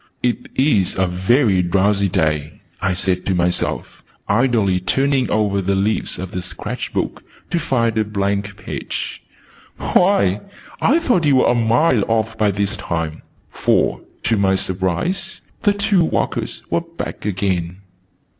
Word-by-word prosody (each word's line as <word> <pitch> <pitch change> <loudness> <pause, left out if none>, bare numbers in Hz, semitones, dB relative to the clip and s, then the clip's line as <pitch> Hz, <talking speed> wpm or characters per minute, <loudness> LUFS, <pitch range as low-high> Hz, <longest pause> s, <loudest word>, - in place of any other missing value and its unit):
"It 125 -1 -1
is 115 -9 +2
a 95 - +3
very 95 +3 +2
drowsy 100 +2 +2
day," 75 -3 -1 0.2
I 95 0 +1
said 90 0 0
to 95 - +1
myself, 90 0 -1 0.3
idly 105 -4 +2
turning 135 +7 +1
over 105 -2 +1
the 95 +1 0
leaves 100 +3 0
of 95 0 -6
the 90 - -3
sketch 90 - -6
book - - -3 0.3
to 170 - +1
find 115 -7 +1
a - - +3
blank 100 -1 -2
page. - - -5 0.6
"Why, 140 - +2 0.4
I 300 - +4
thought 245 - +2
you 140 - +5
were 130 - +4
a - - +3
mile 120 +1 +3
off 110 0 0
by 110 -2 +2
this 100 0 -1
time!" 80 -2 -3 0.3
For, - - +1 0.2
to 115 - +2
my 95 -1 +3
surprise, 95 - -2 0.2
the 205 -2 +3
two 200 -3 +2
walkers - - -2
were 170 - +2
back 170 0 -7
again. 95 -2 -2
100 Hz, 145 wpm, -19 LUFS, 95-130 Hz, 0.6 s, you